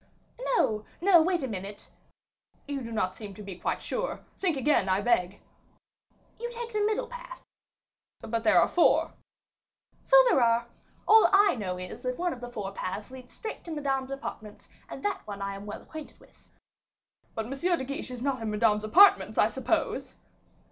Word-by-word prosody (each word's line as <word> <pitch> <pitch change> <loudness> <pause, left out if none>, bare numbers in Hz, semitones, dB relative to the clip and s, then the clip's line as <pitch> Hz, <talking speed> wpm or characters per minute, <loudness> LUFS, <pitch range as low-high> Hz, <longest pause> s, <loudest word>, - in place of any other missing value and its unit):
"No, 215 - +1 0.2
no, 355 -2 +6
wait 350 -2 +1
a - - -1
minute 200 -2 -7 0.4
" - - -41
"You 285 -1 -3
do 230 -2 -7
not 195 -5 -1
seem 200 -1 -9
to 210 - -10
be 190 -3 -8
quite - - -2
sure. - - -3 0.2
Think 350 -6 +1
again, 265 -8 +2
I 190 +1 +2
beg." 200 -4 +1 1.0
"You 475 +1 -4
take 475 -1 -7
the 425 - 0
middle 430 0 0
path." - - -10 0.8
"But 230 0 -3
there 225 - +5
are - - +4
four." 350 - +3 0.9
"So - - +6
there 370 - +4
are. 235 0 +3 0.4
All 440 +1 +7
I 405 +1 +5
know 190 -6 -4
is, 180 0 -8
that 255 0 -3
one 355 0 -1
of 245 - -11
the 245 - -6
four 205 -5 -5
paths 200 +4 -5
leads 255 -1 -12
straight 440 - -7
to 340 - -7
Madame's 270 -3 -2
apartments; 220 -6 -8 0.2
and - - -8
that 410 - -1
one 205 -1 -7
I 200 0 -3
am 200 +1 -9
well 205 - -7
acquainted 315 -1 -10
with." - - -24 0.9
"But 220 - -2
M. 240 - -8
de 335 +3 0
Guiche 275 0 -5
is 250 -1 -6
not 270 -3 -1
in 225 - -2
Madame's 210 0 +2
apartments, 365 - +5
I - - +4
suppose?" - - -2
250 Hz, 185 wpm, -28 LUFS, 210-350 Hz, 1.0 s, All